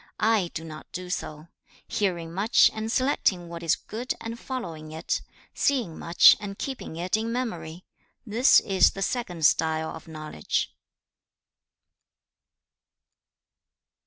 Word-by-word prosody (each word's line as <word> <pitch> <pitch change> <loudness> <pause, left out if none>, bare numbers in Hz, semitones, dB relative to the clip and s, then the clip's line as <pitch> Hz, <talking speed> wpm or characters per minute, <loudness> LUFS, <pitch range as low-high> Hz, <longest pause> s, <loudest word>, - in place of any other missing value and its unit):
I 215 -5 +2
do 160 - -4
not 155 -1 -10
do 180 0 -6
so. 155 -1 -5 0.4
Hearing 170 -5 -1
much 205 +6 +4
and 220 0 -3
selecting 205 -10 +1
what 170 0 -7
is 165 0 +2
good 240 +4 -5
and 230 +1 -6
following 165 - -6
it; 160 +1 -2 0.3
seeing 245 - 0
much 170 +1 +7
and 200 -2 -6
keeping 265 -11 -5
it 180 +4 -1
in 225 +1 -2
memory: 180 -9 -4 0.4
this 235 +4 +5
is 190 -3 +4
the 195 - -3
second 180 -9 -2
style 160 0 +2
of 160 - -11
knowledge.' 155 - -3
180 Hz, 125 wpm, -26 LUFS, 160-225 Hz, 0.4 s, much